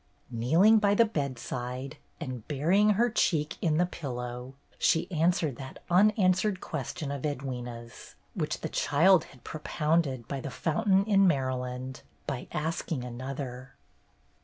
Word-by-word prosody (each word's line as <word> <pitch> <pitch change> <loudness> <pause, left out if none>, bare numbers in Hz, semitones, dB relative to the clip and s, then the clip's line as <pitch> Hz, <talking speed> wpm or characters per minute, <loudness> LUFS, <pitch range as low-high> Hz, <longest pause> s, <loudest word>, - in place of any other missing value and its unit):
Kneeling 165 - +5
by 205 -1 +3
the 230 - +6
bedside, 130 - -4 0.2
and 130 -8 -6
burying 180 +9 +3
her 240 +2 +4
cheek 160 -9 +1
in 155 -2 +2
the 175 - +4
pillow, 125 -5 -6 0.2
she 165 0 +2
answered 165 -5 +1
that 135 -1 -8
unanswered 190 0 +3
question 150 -5 -4
of 140 -2 -4
Edwyna's, 125 -5 -6 0.2
which - - -3
the - - -3
child 165 +4 +4
had 125 - -18
propounded 150 -5 -1
by 140 - -3
the 140 - -5
fountain 190 - +1
in 195 -2 +4
Maryland, 130 -3 -2 0.2
by 135 -4 -4
asking 160 -3 -2
another. 130 0 -6
145 Hz, 130 wpm, -29 LUFS, 130-180 Hz, 0.2 s, the